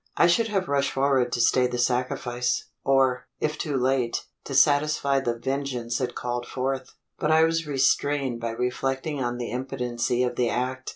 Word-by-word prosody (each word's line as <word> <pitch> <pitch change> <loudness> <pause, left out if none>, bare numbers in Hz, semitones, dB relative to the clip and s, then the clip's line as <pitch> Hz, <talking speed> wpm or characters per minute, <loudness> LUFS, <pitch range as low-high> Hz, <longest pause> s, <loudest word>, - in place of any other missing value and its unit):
I - - +6
should 220 +7 +3
have 195 -4 -1
rushed 140 0 +1
forward 135 -2 +2
to 120 - -1
stay 125 +1 +4
the 125 0 -4
sacrifice, 125 0 -1
or, 130 -2 +2
if 150 0 -1
too 145 -4 -1
late, 130 -2 0 0.2
to - - -4
satisfy 145 -1 +3
the 120 -3 -2
vengeance 130 -2 -2
it 125 -1 -2
called 120 0 -3
forth; 130 0 -3 0.2
but 150 - 0
I 160 0 +5
was 165 -1 +1
restrained 135 -2 +1
by 115 - -2
reflecting 135 +4 -2
on 120 0 -2
the 120 -1 -4
impotency 125 -1 -1
of 125 -1 -2
the 120 -2 +2
act. 130 +1 -2
130 Hz, 175 wpm, -25 LUFS, 125-140 Hz, 0.2 s, I